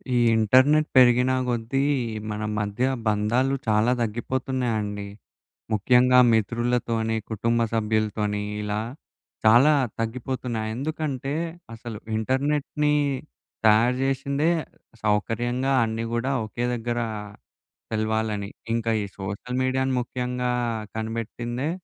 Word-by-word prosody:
ఈ - - +4 0.2
ఇంటర్నెట్ 130 +8 +4
పెరిగినా 125 0 +6
గొద్దీ 120 +3 0 0.5
మన 105 0 -4 0.2
మధ్య 105 +3 -2 0.2
బంధాలు 110 +6 +2
చాలా 110 +3 +3
తగ్గిపోతున్నాయండి. 115 -3 -2 0.7
ముఖ్యంగా 125 +4 +5
మిత్రులతోని, 115 0 0
కుటుంబ 115 +2 0
సభ్యులతోని, 105 -1 0 0.2
ఇలా 105 0 -2 0.7
చాలా 120 +8 +7 0.3
తగ్గిపోతున్నాయి. 115 -1 -3
ఎందుకంటే, 140 -1 -3 0.4
అసలు 115 -1 -7 0.2
ఇంటర్నెట్‌నీ 145 +5 0 0.7
తయారు 110 +3 +5
జేషిందే 140 +3 0 0.5
సౌకర్యంగా 120 +5 0
అన్నీ 115 0 -2
గూడా 120 +3 0
ఒకే 120 +3 -3
దగ్గరా 120 0 -2 0.8
తెలవాలని. 110 -2 -1 0.2
ఇంక 115 -1 -1 0.2
ఈ - - -3
సోషల్ 100 +6 -4
మీడియాను 130 0 0
ముఖ్యంగా 125 0 -2 0.4
కనిపెట్టిందే 115 +4 -3
120 Hz, 90 wpm, -25 LUFS, 110-130 Hz, 0.8 s, చాలా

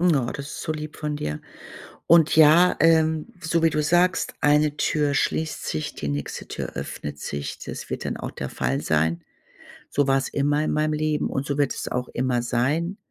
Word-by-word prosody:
Oh, 155 -8 +3
das 140 - -6
ist - - -7
so 155 - -2
lieb 155 -1 -7
von 150 -1 -3
dir. 75 - -4 0.7
Und 165 -2 +5
ja, 160 +4 +6
ähm, 160 -1 +3
so 165 0 0
wie 165 - +4
du 150 - 0
sagst, 175 +4 +2
eine 150 0 +3
Tür 150 -2 +1
schließt 155 +3 -1
sich, 75 - -3
die 75 - -4
nächste 70 0 -4
Tür - - -5
öffnet 75 0 -6
sich. 70 0 -5
Das - - -8
wird - - -4
dann - - -3
auch - - -5
der 65 - -6
Fall 65 +2 -1
sein. 80 +2 0 0.7
So 145 -1 +1
war's 135 0 +1
immer 145 +1 +1
in - - -1
meinem 155 0 +1
Leben 155 0 0
und 135 - -2
so 140 0 -2
wird 145 -2 +1
es - - -5
auch 125 0 -2
immer 125 -1 0
sein. 145 +10 0
150 Hz, 195 wpm, -24 LUFS, 125-155 Hz, 0.7 s, ja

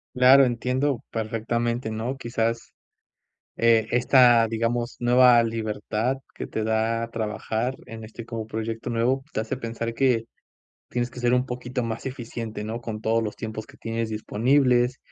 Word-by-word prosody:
Claro. 130 +2 +7
Entiendo 125 +2 -1
perfectamente, 115 +1 -2
¿no? 115 +5 -3
Quizás. 115 -2 -2 0.8
Esta, 115 +1 +5
digamos, 115 +2 -1
nueva 120 0 +6
libertad, 110 +2 -2 0.2
que - - -5
te 110 - -3
da 115 +1 0
trabajar 110 +3 -2
en 115 0 -9
este 110 +1 -9
como 115 -2 -5
proyecto 110 +1 -4
nuevo 120 +3 +1
te - - 0
hace 120 +4 -3
pensar 115 -1 -4
que 115 -2 +2 0.6
tienes 120 0 -2
que 125 - -9
ser 125 0 +3
un 125 - +2
poquito 125 0 -4
más 115 +2 -4
eficiente, 115 -4 -5
¿no?, 115 +2 -4
con 110 -2 -6
todos 115 +1 +2
los 105 -2 -4
tiempos 110 -1 -6
que - - -16
tienes 115 0 -3
disponibles 125 +3 +2
115 Hz, 145 wpm, -25 LUFS, 110-125 Hz, 0.8 s, Claro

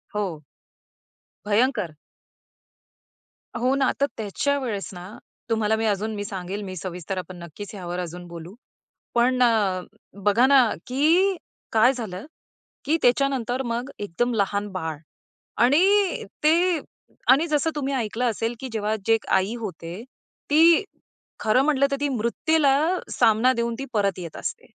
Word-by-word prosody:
हो. 180 -7 -3 1.0
भयंकर. 210 - +1 1.6
हो 250 +2 +1
ना. 270 -2 +2
तर - - +6
त्याच्या 225 +7 -1
वेळेस 220 -7 -4
ना, 180 +3 -9 0.3
तुम्हाला 220 -1 +2
मी 225 0 -1
अजून 215 +1 -1
मी 205 - -3
सांगेल 195 0 -5
मी 185 -1 -6
सविस्तर 180 +1 -5
आपण 185 0 -6
नक्कीच 195 +6 -9
ह्यावर 180 -2 -5
अजून 175 0 -6
बोलू. 170 +2 -9 0.6
पण 250 +2 +3
अ, 205 -6 +2 0.4
बघा 210 +5 +4
ना, 265 -4 +6 0.2
की 330 +9 +3 0.4
काय 225 +4 +5
झालं, 215 -6 -6 0.6
की 310 +4 +2
त्याच्या 250 +3 +4
नंतर 255 -1 -2
मग 240 +2 -3
एकदम 205 +5 -1
लहान 200 0 0
बाळ 160 -5 -4 0.7
आणि 375 +9 +3 0.2
ते 335 +2 +3 0.5
आणि 285 +6 +6
जसं 305 0 +1
तुम्ही 280 -2 -2
ऐकलं 235 0 -1
असेल 225 +2 -2
की 265 - -5
जेव्हा 215 0 -1
जी 225 - +4
एक 225 - 0
आई 190 +4 -1
होते, 185 -2 -7 0.5
ती 325 +4 +6 0.6
खरं 220 +4 +3
म्हटलं 280 -2 +3
तर 275 - +2
ती 290 - +2
मृत्यूला 270 +5 +2 0.4
सामना 225 +4 +4
देऊन 235 -1 -1
ती 270 - -4
परत 200 -3 +1
येत 170 -3 -7
असते - - -5
225 Hz, 145 wpm, -24 LUFS, 195-270 Hz, 1.6 s, तर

